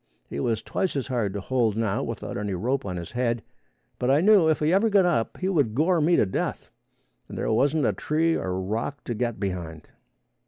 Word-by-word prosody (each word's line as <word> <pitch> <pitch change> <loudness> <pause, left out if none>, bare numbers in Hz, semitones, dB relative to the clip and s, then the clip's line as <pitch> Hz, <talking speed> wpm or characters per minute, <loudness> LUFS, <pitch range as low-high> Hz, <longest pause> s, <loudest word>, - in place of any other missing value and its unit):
He - - -5
was 110 +8 -1
twice 190 - -2
as 135 -1 -2
hard 115 -6 0
to 100 - -3
hold 115 -1 0
now 110 -2 0
without 115 -2 -5
any 100 -2 -2
rope 125 +8 -1
on 90 -2 -3
his 85 -1 -7
head, 120 -2 -1 0.6
but 125 - 0
I 140 +2 +5
knew 190 -2 +5
if 155 - +3
he 155 +3 +2
ever 210 +4 +3
got 200 -3 +4
up, 150 -11 0
he 185 - -2
would 145 - +1
gore 165 +4 +2
me 170 +3 +4
to - - +4
death, 95 - -3 0.6
as - - -8
there - - -1
wasn't 140 +5 +2
a 105 - +2
tree 160 - +1
or 95 0 -2
rock 110 +9 -3
to 120 - -3
get 120 0 -2
behind. 85 -6 -5
120 Hz, 220 wpm, -25 LUFS, 105-155 Hz, 0.6 s, I